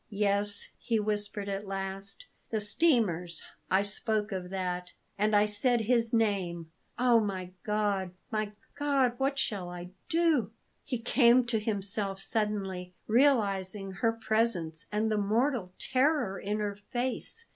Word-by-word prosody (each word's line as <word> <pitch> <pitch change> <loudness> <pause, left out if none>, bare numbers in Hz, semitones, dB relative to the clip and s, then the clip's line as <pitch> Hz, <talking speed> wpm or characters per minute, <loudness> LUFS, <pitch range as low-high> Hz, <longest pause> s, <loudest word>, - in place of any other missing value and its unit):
"Yes," 205 0 0
he 230 -2 0
whispered 205 -1 -2
at 200 +1 -3
last; 195 - -5 0.2
"the 220 - 0
steamers 205 - +2 0.3
I 190 +2 +4
spoke 210 +1 -1
of 185 -2 -4
that; 180 -1 -3 0.3
and 210 +1 +2
I 205 0 +6
said 225 +3 +2
his 230 0 +2
name 190 -8 0 0.3
oh, 245 -2 +5
my 190 -4 -3
God! 205 -3 0 0.2
my 215 -1 -1 0.2
God! 280 -4 +2
What 275 +1 +1
shall 195 -8 -2
I 175 0 -8 0.2
do?" 320 -10 +2 0.3
He 250 - -2
came 240 +1 +4
to 235 -2 0
himself 200 -2 -1
suddenly, 195 -4 -2
realizing 205 -6 +2
her 225 +5 +1
presence 220 -8 0
and 215 +1 +1
the 215 - +2
mortal 220 0 +1
terror 260 -6 +1
in 210 +2 -2
her 205 -1 -3
face. 260 - -3
210 Hz, 135 wpm, -30 LUFS, 195-235 Hz, 0.3 s, I